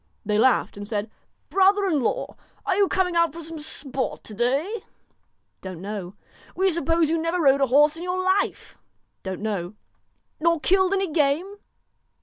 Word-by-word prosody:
They 210 0 +1
laughed 255 -3 +2
and 205 0 -7
said: 215 0 -3 0.4
'Brother 395 +1 +4
in 315 -7 +1
law, - - -2 0.3
are 390 -3 +1
you 400 0 +3
coming 370 -2 0
out 335 -3 +3
for 335 0 -8
some 325 0 -7
sport 275 -3 -3
to 215 - -9
day? 280 - 0 0.3
' - - -46
' - - -49
Don't 185 -3 -7
know.' 195 -1 -6 0.4
'We 380 +1 +2
suppose 330 0 +1
you 330 - +1
never 330 +2 -1
rode 275 -3 +4
a 275 - +4
horse 295 +5 +4
in - - -8
your 360 +1 -2
life?' 375 +2 -1 0.2
' - - -49
Don't 190 0 -5
know.' 205 -3 -3 0.3
' - - -47
Nor 335 0 +3
killed 380 +3 +3
any 385 -3 -1
game 310 +7 0
320 Hz, 185 wpm, -24 LUFS, 240-370 Hz, 0.4 s, Brother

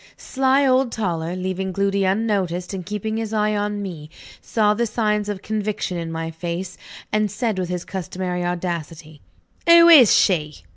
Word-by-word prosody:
Sly 270 +1 +1
old 260 -1 +2
Toller, 175 -6 -3
leaving 190 +1 -3
Gloody 200 +1 0
unnoticed, 190 -3 -1
and 190 -2 -5
keeping 210 +3 -4
his 225 -1 -4
eye 215 0 +1
on 205 0 -2
me, 160 -6 -7 0.3
saw 210 -2 +1
the 235 +2 -1
signs 210 -2 -1
of 200 -2 -5
conviction 215 -3 -3
in 165 -1 -4
my 165 0 -4
face, 175 +2 -5 0.4
and 215 -1 +1
said 215 -1 -2
with 180 -1 -3
his 180 -1 -4
customary 180 -1 -4
audacity: 170 -3 -5 0.5
"Who 335 0 +8
is 275 - +8
she?" 150 - 0
195 Hz, 160 wpm, -21 LUFS, 175-215 Hz, 0.5 s, Who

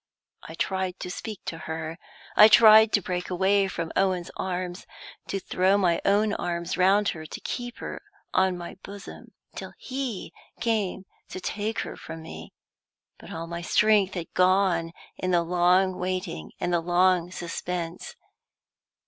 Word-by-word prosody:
I - - -10
tried 190 -1 -2
to 180 - -4
speak 210 +1 -6
to 165 - -5
her; 160 +1 -4 0.4
I 210 - +10
tried 220 0 +8
to 205 - +3
break 180 0 -3
away 195 +2 +2
from 165 -3 -4
Owen's 185 -2 +1
arms, 180 -1 -4 0.4
to 195 - -2
throw 190 +1 +2
my 175 -4 +2
own 205 +1 +3
arms 170 -1 -2
round 195 +3 +4
her, 155 -1 -6
to - - -7
keep 245 -1 -5
her - - -6 0.3
on 185 -1 +2
my 175 +1 -8
bosom, 200 0 -11 0.2
till - - -7
he 260 -6 -5 0.3
came 210 -5 -1 0.2
to - - -6
take 215 +4 -2
her - - -6
from 160 0 -9
me. 160 - -9 0.7
But - - -12
all 165 +1 -5
my 170 0 -6
strength 200 +1 +3
had 170 -2 -6
gone 180 -3 +3 0.3
in 185 - -2
the 175 -2 +3
long 180 +2 +3
waiting 180 - -3
and 175 - -1
the 170 - +2
long 180 0 +3
suspense. 175 -1 -5
185 Hz, 155 wpm, -26 LUFS, 175-200 Hz, 0.7 s, I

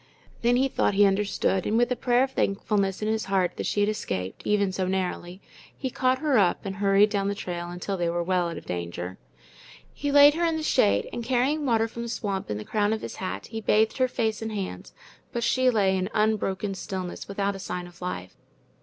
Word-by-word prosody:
Then 240 +1 +3
he 265 +2 +3
thought 205 - 0
he 205 +1 +6
understood, 195 -1 +1
and 220 - +1
with 240 +1 +2
a - - +2
prayer 245 +1 +2
of 265 - -2
thankfulness 195 -2 0
in - - 0
his 220 0 0
heart 185 -2 +1
that - - -2
she 205 - 0
had 205 - +3
escaped, 95 - -4
even 200 -2 +2
so 185 0 -2
narrowly, 185 0 -3 0.4
he 260 -2 -3
caught 255 +1 +2
her 285 -5 +2
up 190 0 +2
and 195 0 -4
hurried 200 +1 +4
down 200 -1 0
the 200 - -1
trail 175 -3 -5
until 180 +3 -4
they 175 -1 0
were 170 0 -1
well 180 -1 +1
out 165 - -6
of - - -9
danger. 90 +1 -5 0.7
He 285 0 -2
laid 285 +1 +8
her 335 +3 -1
in 330 -1 +1
the 315 - -4
shade, 100 - +3
and 235 - -4
carrying 265 +5 +1
water 225 -2 +2
from 235 +1 -7
the 235 - -4
swamp 200 -4 -3
in 105 - -2
the 105 - -7
crown 210 0 +1
of 220 - -3
his - - -7
hat, 185 - -4
he 225 -1 -6
bathed 220 +3 +2
her 255 - +4
face 220 -3 -1
and 220 0 -3
hands; 200 -3 -5 0.4
but 235 -2 -2
she 255 +1 +3
lay 200 -5 +2
in 185 +1 -1
unbroken 210 -2 0
stillness, 185 -1 -5
without 200 0 -1
a - - -7
sign 180 -1 -4
of 175 0 -15
life. 95 - -5
200 Hz, 230 wpm, -26 LUFS, 185-235 Hz, 0.7 s, laid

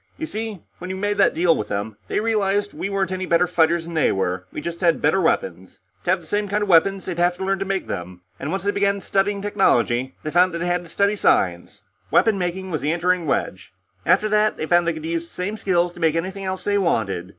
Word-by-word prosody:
You 320 - -3
see, 220 - -5 0.2
when 180 - -7
we 190 - -3
made 205 +2 -2
that - - +4
deal 170 0 +3
with 105 - -3
them, 100 +1 -3
they - - 0
realized 205 -2 0
that - - -19
we 195 - -3
weren't 195 -2 -1
any 185 0 -3
better 170 +1 +3
fighters 170 -1 +2
than 170 - -8
they 155 - +2
were; 90 -1 -2
we - - -5
just 170 +1 -6
had 170 -2 +3
better 190 - +2
weapons. 95 - -1 0.3
To - - -2
have 185 0 +2
the - - -15
same 205 +5 -1
kind 205 +1 0
of 205 - -4
weapons, 190 +3 +4
they'd 175 -2 -4
have 175 0 +2
to 190 - -4
learn 195 0 0
to 195 - -2
make 195 0 -2
them, 90 0 -6 0.2
and 140 - -4
once 190 +2 -2
they 200 - +1
began 200 0 0
studying 200 +1 0
technology, 130 - +1
they 155 - -3
found 180 +1 +3
that - - -1
they 170 - -3
had 175 0 0
to 170 - -13
study 200 +4 +1
science. 90 - +1 0.3
Weapon 215 -3 +3
making 185 +1 -3
was 155 -5 -2
the 150 +3 0
entering 175 0 0
wedge; 95 -8 -2 0.3
after 195 - +3
that, 210 0 +2
they - - -3
found 175 +1 +3
that 170 - +2
they 160 - -7
could 155 - -8
use 165 0 -2
the - - -16
same 195 +4 -3
skills 180 -4 0
to 175 - -13
make 160 -2 +2
anything 190 +4 -3
else 190 0 -3
they 205 0 +1
wanted. 100 - -1
180 Hz, 260 wpm, -22 LUFS, 160-195 Hz, 0.3 s, that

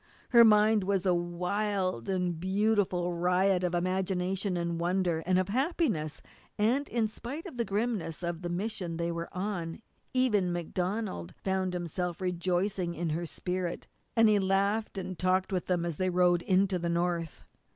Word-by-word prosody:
Her 235 -1 +8
mind 215 -1 +5
was 195 0 0
a 185 - +4
wild 180 - -1
and 180 -3 -1
beautiful 190 -2 +1
riot 180 +2 +2
of 180 -1 0
imagination, 185 +1 -1
of 170 -1 -2
wonder, 175 -1 +1
and 185 0 +3
of 185 +1 +1
happiness, 255 - 0 0.3
and 245 +7 +1
in 230 -2 +1
spite 255 - -6
of 325 -10 -8
the 235 - 0
grimness 205 -6 -2
of 170 -1 -3
the 175 - -3
mission 180 -2 -3
they 170 0 -1
were 170 0 -4
on 180 -3 -3 0.3
even 210 -8 +2
MacDonald 175 - -3
found 190 -1 0
himself 175 0 -3
rejoicing 180 0 -1
in 170 +1 -2
her 170 +2 -2
spirit, 180 +1 -3 0.3
and 225 -1 +6
he 210 -1 +4
laughed 200 +3 +1
and 185 -2 -5
talked 185 +1 +1
with 180 - -1
them 175 -2 +1
as 170 -4 -3
they 185 0 +1
rode 175 -1 +3
into 190 0 +2
the 170 0 -2
North. 170 -1 -1
185 Hz, 160 wpm, -30 LUFS, 175-200 Hz, 0.3 s, Her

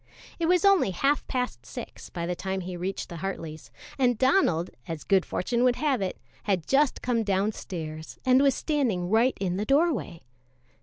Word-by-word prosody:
It 330 - +1
was 360 +2 +3
only 395 - +5
half 275 +11 +1
past 250 -2 -2
six - - -9
by 170 -2 -4
the 180 - -1
time 190 +1 -3
he 180 0 -6
reached 185 +3 -4
the 170 - -8
Hartleys', 160 -8 -6 0.3
and 245 -3 +3
Donald, 260 - +2 0.2
as 165 -2 -5
good 195 -2 +3
fortune 235 +6 0
would 250 -1 +4
have 275 -4 0
it, 185 -1 -2 0.3
had 190 -5 0
just 280 0 +2
come 240 -2 +1
downstairs 190 -6 -3
and 255 +1 +5
was 280 -1 +4
standing 230 - 0
right 235 +4 +3
in 185 -2 -1
the 205 - -1
doorway. 275 - +1
205 Hz, 175 wpm, -27 LUFS, 180-265 Hz, 0.3 s, only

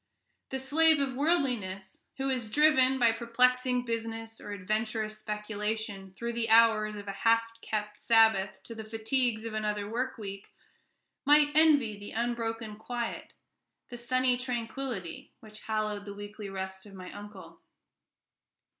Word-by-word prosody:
The 265 - -2
slave 310 +4 +4
of 275 -2 0
worldliness, 245 - -1
who 270 0 -1
is 240 -4 -2
driven, 265 -1 +4
by 235 -3 +5
perplexing 250 +2 +2
business 225 -1 -4
or - - -9
adventurous 215 +2 -2
speculation, 210 -2 -4
through 235 +3 -4
the 230 -1 -2
hours 220 -2 +5
of 205 -1 -8
a - - -2
half 230 0 +4 0.2
kept 210 -1 -3
Sabbath 220 -4 +3
to 230 - -8
the 225 -1 -7
fatigues 225 +1 -1
of 225 - -5
another 210 -1 -2 0.3
week, 200 -2 -8 0.7
might 295 0 +5
envy 290 -10 +4
the 205 - -9
unbroken 225 -2 -2
quiet, 235 +1 -5 0.6
the 245 - -7
sunny 255 +1 +1
tranquillity, 240 -6 -5
which 215 -1 -12
hallowed 215 -2 -2
the 200 -1 -7
weekly 205 0 -8
rest 190 +1 -6
of 195 - -13
my 185 -1 -9
uncle. 205 -2 -11
225 Hz, 135 wpm, -30 LUFS, 210-250 Hz, 0.7 s, by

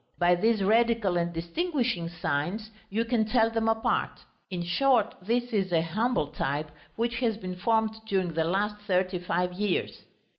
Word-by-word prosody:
By 175 0 +4
these 215 +3 +2
radical 225 -2 +3
and 170 0 0
distinguishing 230 - -1
signs 175 +6 -2 0.2
you 225 +4 0
can 230 -2 +2
tell 225 +1 +2
them 225 0 0
apart; 225 0 0 0.3
in 180 -2 -3
short, 230 +5 +2
this 240 +5 -1
is 195 -3 0
a 165 -2 +3
humble 215 - 0
type 150 0 -2 0.2
which 235 +1 -1
has 230 -4 +1
been 185 -4 -6
formed 220 +3 +2
during 185 -4 0
the 160 0 +1
last 205 +4 0
thirty 185 -1 +1
five 180 0 -1
years. 200 0 -1
200 Hz, 160 wpm, -28 LUFS, 175-230 Hz, 0.3 s, By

